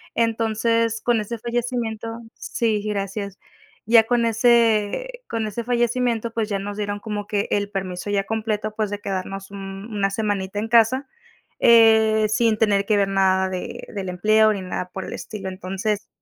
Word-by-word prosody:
Entonces, 230 0 +1
con 240 -2 +2
ese 230 +3 -5
fallecimiento 235 -1 -3 0.3
Sí, 220 -3 -1
gracias. 200 -1 -3 0.5
Ya 225 +1 +6
con 240 0 +2
ese 230 - +2
con 225 -1 -2
ese 215 +3 -4
fallecimiento, 240 -1 0
pues 225 -2 -1
ya 200 -2 -1
nos 205 +1 -5
dieron 205 -1 -3
como 205 -1 -5
que 205 -1 -1
el 205 0 0
permiso 190 -1 -4
ya 200 -1 +1
completo, 215 0 -2
pues 215 -2 -1
de 205 - -3
quedarnos 195 0 -5
un 195 +1 -7
una 200 -1 +1
semanita 205 -2 -2
en 220 - -2
casa, 240 +4 +4 0.5
eh, 220 -2 +6
sin 220 0 +2
tener 205 -2 +2
que 210 0 +2
ver 200 -1 +2
nada 190 -1 +2
de 185 -1 -6
del 195 -2 -4
empleo, 215 +4 +3
ni 200 - -4
nada 180 0 -4
por 190 - -5
el - - -6
estilo. 195 -3 -6
Entonces, 195 +3 -3
215 Hz, 165 wpm, -22 LUFS, 200-230 Hz, 0.5 s, Ya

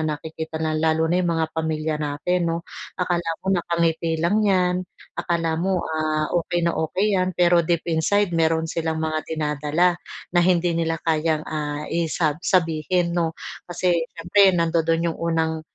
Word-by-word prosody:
nakikita 160 +1 -4
na 160 0 -1
lalo 160 +1 +1
na 175 +3 +2
yung 170 -2 0
mga 160 -1 -1
pamilya 160 -1 -1
natin 165 +4 -1
'no, 165 0 -1 0.4
akala 175 -2 -1 0.2
mo - - -12
nakangiti 170 -2 0
lang 170 +7 +1
'yan, 180 -3 +2 0.4
akala 165 -1 0
mo 185 -1 0
ah, 155 -1 -1
okey 175 0 0
na 170 - +2
okey 190 +6 0
'yan 185 -2 0
pero 175 -1 +5
deep 170 0 0
inside, 190 +4 +2
meron 160 -1 +2
silang 160 0 -2
mga 155 0 -1
dinadala 155 +3 0 0.3
na 175 - +4
hindi 175 -1 +2
nila 165 -1 0
kayang, 155 -1 +1
ah, 150 -1 -4
isa 160 -2 0
sabihin 170 0 +1
'no. 165 -2 -1 0.3
Kasi 175 0 +1 0.2
siyempre 185 +2 +4
nandodon 165 0 +1
yung - - -12
unang 160 -1 0
165 Hz, 155 wpm, -23 LUFS, 160-175 Hz, 0.4 s, pero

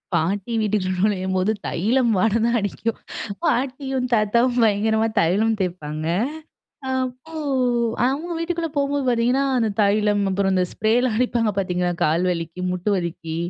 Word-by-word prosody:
பாட்டி 195 +7 -1
வீட்டுக்கு 210 -3 0
நுழையும்போது 190 0 +1 0.2
தைலம் 235 +6 +1
வாடை 220 +4 +2
தான் 235 0 +2
அடிக்கும். 215 +2 -3 0.4
பாட்டியும் 265 0 0
தாத்தாவும் 235 +3 +2
பயங்கரமா 220 +1 +2
தைலம் 215 +6 +2
தேய்ப்பாங்க 155 -4 -3 0.9
அப்போ 255 +3 -4 0.7
அTங்க 300 +7 -1
வீட்டுக்குள்ள 335 0 -2
போகும்போது 280 -1 0
பார்த்தீங்கன்னா, 245 +3 +2
அந்த 230 -2 +2
தைலம், 205 0 +3
அப்புறம் 195 0 +1
அந்த 185 -1 +2
ஸ்ப்ரே 215 0 0
லாம் 235 -4 0
அடிப்பாங்க 240 -2 +1
பார்த்தPங்களா? 180 -2 0
கால் 160 +3 +2
வலிக்கு, 165 0 -5
மூட்டு 180 +2 -2
வலிக்கு 165 -3 -4
215 Hz, 130 wpm, -22 LUFS, 185-250 Hz, 0.9 s, தைலம்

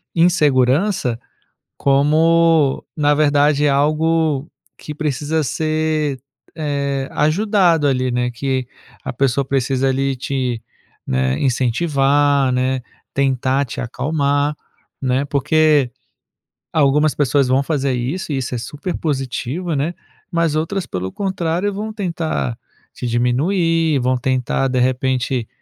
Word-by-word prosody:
insegurança 150 - +2 0.6
como, 155 +1 +3
na 145 -1 +3
verdade, 145 0 +3
algo 155 +1 +1 0.3
que 150 - -7
precisa 150 +1 -1
ser, 155 -1 -1 0.4
eh, 140 -3 -2
ajudado, 170 -1 +2
ali, 130 -1 0
né. 125 0 0
Que 130 +1 -2 0.4
a - - -3
pessoa 135 +1 +1
precisa 135 0 0
ali 135 0 0
te, 125 -3 -2 0.4
né, 65 +1 0
incentivar, 135 +1 +2
né, 130 +1 0 0.3
tentar 135 0 +1
te 115 - -6
acalmar, 145 +3 0 0.5
né, 130 +2 +1
porque 150 -1 +2 0.8
algumas 150 0 +3
pessoas 140 -1 +2
vão 130 +2 +2
fazer 140 -3 -1
isso 140 +6 -3
e - - -1
isso 130 -1 -3
é - - -1
super 145 +9 -5
positivo, 145 +3 -3
né? 150 +5 -1 0.4
Mas 165 -3 +1
outras, 175 +5 -1
pelo 95 +1 -4
contrário, 190 0 -1
vão 215 +2 -5
tentar 165 - -2 0.4
te 125 - -7
diminuir, 155 +6 +1
vão 130 +1 +1
tentar 130 +1 0
de 125 - 0
repente, 130 -1 0
140 Hz, 115 wpm, -19 LUFS, 130-155 Hz, 0.8 s, como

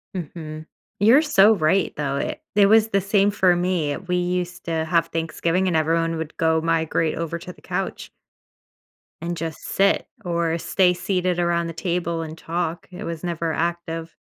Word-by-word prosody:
Mhm, 155 -2 -6 0.3
you're 235 +9 +6
so 220 -8 +5
right 180 +2 +1
though, 140 -2 -2
it - - -3
it 205 -1 +6
was 220 +1 +5
the 195 -2 +2
same 200 +1 +2
for 185 -3 +3
me, 175 -5 0
we 180 -1 -3
used 180 0 -2
to 160 -1 -1
have 165 0 +2
Thanksgiving, 165 +3 -1
and 175 - +1
everyone 165 +1 +1
would 160 -1 -6
go 160 0 +2
migrate 165 -1 0
over 170 0 -3
to 180 - -8
the - - -19
couch - - -4 1.1
and 170 0 -3
just 165 -1 -5
sit 200 +1 +2 0.2
or 170 -1 0
stay 180 +1 +2
seated 180 -1 -1
around 170 -1 +1
the 165 - -5
table 170 0 -2
and 160 0 -7
talk, 170 0 -3
it 180 - -8
was 165 0 -5
never 170 -2 -2
active. 165 -1 -3
170 Hz, 170 wpm, -23 LUFS, 165-180 Hz, 1.1 s, you're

